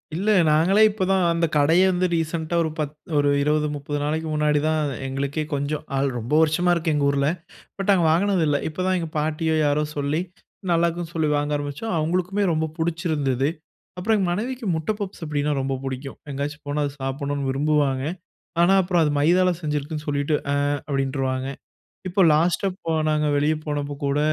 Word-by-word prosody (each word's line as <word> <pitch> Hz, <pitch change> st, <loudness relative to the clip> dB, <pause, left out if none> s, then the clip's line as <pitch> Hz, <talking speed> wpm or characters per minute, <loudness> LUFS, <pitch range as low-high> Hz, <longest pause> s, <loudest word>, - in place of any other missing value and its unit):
இல்ல, 195 Hz, +6 st, -1 dB, 0.2 s
நாங்களே 175 Hz, +8 st, +4 dB
இப்ப 205 Hz, -2 st, -3 dB
தான் 190 Hz, -1 st, +3 dB
அந்த 165 Hz, 0 st, +1 dB
கடையே 165 Hz, +6 st, +4 dB
வந்து, 180 Hz, 0 st, +1 dB
ரீசென்ட்‌டா 165 Hz, 0 st, -2 dB
ஒரு 160 Hz, -, -1 dB
பத் 150 Hz, -1 st, -2 dB, 0.2 s
ஒரு 145 Hz, 0 st, +3 dB
20, 150 Hz, +1 st, +1 dB
30 145 Hz, +1 st, -4 dB
நாளைக்கு 160 Hz, +2 st, -1 dB
முன்னாடி 150 Hz, -1 st, +2 dB
தான் 155 Hz, 0 st, +1 dB, 0.3 s
எங்களுக்கே, 140 Hz, +3 st, -2 dB
கொஞ்சம் 145 Hz, +1 st, -2 dB
ஆள் 135 Hz, +1 st, +1 dB
ரொம்ப 120 Hz, +5 st, -5 dB
வருஷமா 160 Hz, +3 st, +2 dB
இருக்கு. 160 Hz, -2 st, 0 dB
எங்க 145 Hz, -1 st, +1 dB
ஊர்ல. 140 Hz, 0 st, +1 dB, 0.5 s
பட் 195 Hz, 0 st, -3 dB
நாங்க 180 Hz, -4 st, +3 dB
வாங்குனது 185 Hz, +1 st, +2 dB
இல்ல. 145 Hz, -1 st, +2 dB
இப்ப 160 Hz, -, -11 dB
தான் 185 Hz, -, +2 dB
எங்க 165 Hz, -, -4 dB
பாட்டியோ, 160 Hz, +1 st, 0 dB
யாரோ 145 Hz, +1 st, +2 dB
சொல்லி 145 Hz, +3 st, 0 dB, 0.5 s
நல்லாருக்குன்னு 170 Hz, 0 st, 0 dB
சொல்லி 160 Hz, -2 st, +1 dB
வாங்க 145 Hz, +1 st, -1 dB
ஆரம்பிச்சோம். 145 Hz, +9 st, -4 dB
அவுங்களுக்குமே 180 Hz, +5 st, 0 dB
ரொம்ப 160 Hz, 0 st, 0 dB
புடிச்சிருந்துது. 155 Hz, -6 st, 0 dB, 0.5 s
அப்புறம் 215 Hz, +5 st, +1 dB
எங்க 190 Hz, -3 st, 0 dB
மனைவிக்கு 240 Hz, +6 st, -3 dB
முட்ட 160 Hz, +6 st, -1 dB
பப்ஸ். 200 Hz, -3 st, -6 dB
அப்படினா, 150 Hz, -1 st, -1 dB
ரொம்ப 135 Hz, 0 st, -2 dB
புடிக்கும். 135 Hz, +1 st, -5 dB
எங்கயாச்சும் 145 Hz, +2 st, -4 dB
போனா 145 Hz, +1 st, 0 dB
அதை 140 Hz, -, -3 dB
சாப்பிடணுன்னு 140 Hz, +1 st, -2 dB
விரும்புவாங்க. 140 Hz, -1 st, +1 dB, 0.6 s
ஆனா, 175 Hz, +3 st, +5 dB
அப்புறம் 175 Hz, -1 st, +1 dB
அது 150 Hz, -, +1 dB
மைதால 180 Hz, +5 st, +4 dB
செஞ்சிருக்குன்னு 150 Hz, 0 st, -3 dB
சொல்லிட்டு, 145 Hz, +1 st, 0 dB, 0.2 s
"ஆ" -, -, +2 dB, 0.3 s
அப்படின்ருவாங்க. 135 Hz, -1 st, -1 dB, 0.6 s
இப்போ 190 Hz, +2 st, 0 dB
லாஸ்ட்டா 175 Hz, +5 st, +2 dB, 0.2 s
போன 160 Hz, -1 st, +1 dB
நாங்க 150 Hz, 0 st, +1 dB
வெளியே 150 Hz, +2 st, +2 dB
போனப்ப 145 Hz, -1 st, -3 dB
கூட, 140 Hz, +1 st, +1 dB
155 Hz, 170 wpm, -23 LUFS, 145-170 Hz, 0.6 s, ஆனா